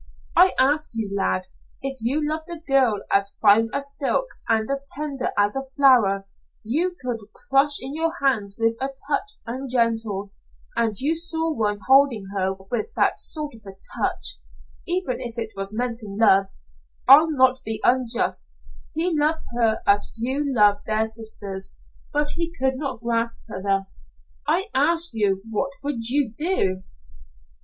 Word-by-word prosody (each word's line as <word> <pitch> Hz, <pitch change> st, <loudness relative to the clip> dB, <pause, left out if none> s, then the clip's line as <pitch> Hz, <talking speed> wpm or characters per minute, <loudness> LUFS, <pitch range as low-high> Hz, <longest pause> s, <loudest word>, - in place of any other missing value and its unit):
"I 365 Hz, +2 st, +6 dB
ask 295 Hz, +4 st, +3 dB
you, 210 Hz, -3 st, -3 dB
lad, 185 Hz, -1 st, -1 dB, 0.3 s
if 270 Hz, 0 st, -3 dB
you 285 Hz, +6 st, 0 dB
loved 315 Hz, +2 st, -3 dB
a 340 Hz, -, -3 dB
girl 270 Hz, -9 st, +2 dB
as 200 Hz, 0 st, +2 dB
fine 220 Hz, +2 st, +5 dB
as 280 Hz, 0 st, -2 dB
silk 300 Hz, -, +1 dB, 0.2 s
and 220 Hz, -1 st, +2 dB
as 275 Hz, 0 st, -1 dB
tender 280 Hz, -3 st, -2 dB
as 205 Hz, +2 st, +3 dB
a 270 Hz, -, -1 dB
flower 230 Hz, -9 st, +4 dB, 0.4 s
you 330 Hz, +11 st, 0 dB
could 245 Hz, -3 st, -3 dB
crush 275 Hz, +2 st, +2 dB
in 265 Hz, +2 st, -4 dB
your 325 Hz, +1 st, 0 dB
hand 220 Hz, -8 st, 0 dB
with 230 Hz, 0 st, +1 dB
a 270 Hz, -, +1 dB
touch 285 Hz, +9 st, -3 dB
ungentle, 230 Hz, -5 st, -1 dB, 0.4 s
and 225 Hz, -3 st, 0 dB
you 290 Hz, +5 st, +1 dB
saw 325 Hz, -1 st, -1 dB
one 210 Hz, -5 st, 0 dB
holding 265 Hz, -6 st, +4 dB
her 190 Hz, -1 st, +1 dB, 0.2 s
with 240 Hz, -3 st, -1 dB
that -, -, +2 dB
sort 300 Hz, -3 st, -2 dB
of 225 Hz, -, -14 dB
a 195 Hz, -1 st, -11 dB, 0.2 s
touch, -, -, -1 dB, 0.5 s
even 350 Hz, -8 st, -1 dB
if 240 Hz, -1 st, -6 dB
it 225 Hz, -1 st, -3 dB
was 195 Hz, 0 st, -3 dB
meant 240 Hz, +1 st, -2 dB
in 200 Hz, -2 st, -8 dB
love, 195 Hz, -3 st, +5 dB, 0.6 s
I'll 295 Hz, +5 st, +8 dB
not 260 Hz, -3 st, +3 dB
be 220 Hz, 0 st, -3 dB
unjust, 235 Hz, -, 0 dB, 0.4 s
he 340 Hz, +3 st, +1 dB
loved 305 Hz, +2 st, +1 dB
her 225 Hz, -2 st, +1 dB
as 205 Hz, 0 st, +3 dB
few 260 Hz, +5 st, -1 dB
love 210 Hz, -8 st, +4 dB
their 220 Hz, 0 st, +1 dB
sisters 215 Hz, -4 st, -6 dB, 0.4 s
but 295 Hz, 0 st, 0 dB
he 335 Hz, 0 st, -2 dB
could 265 Hz, -5 st, 0 dB
not 265 Hz, -4 st, -4 dB
grasp 230 Hz, 0 st, 0 dB
her 190 Hz, -, -6 dB
thus; 195 Hz, -, -2 dB, 0.4 s
I 385 Hz, +4 st, +1 dB
ask 330 Hz, +5 st, +3 dB
you 200 Hz, -3 st, 0 dB
what 245 Hz, +5 st, -2 dB
would 240 Hz, -5 st, -2 dB
you 265 Hz, -4 st, +1 dB
do?" 195 Hz, -, 0 dB
245 Hz, 160 wpm, -23 LUFS, 215-285 Hz, 0.6 s, I'll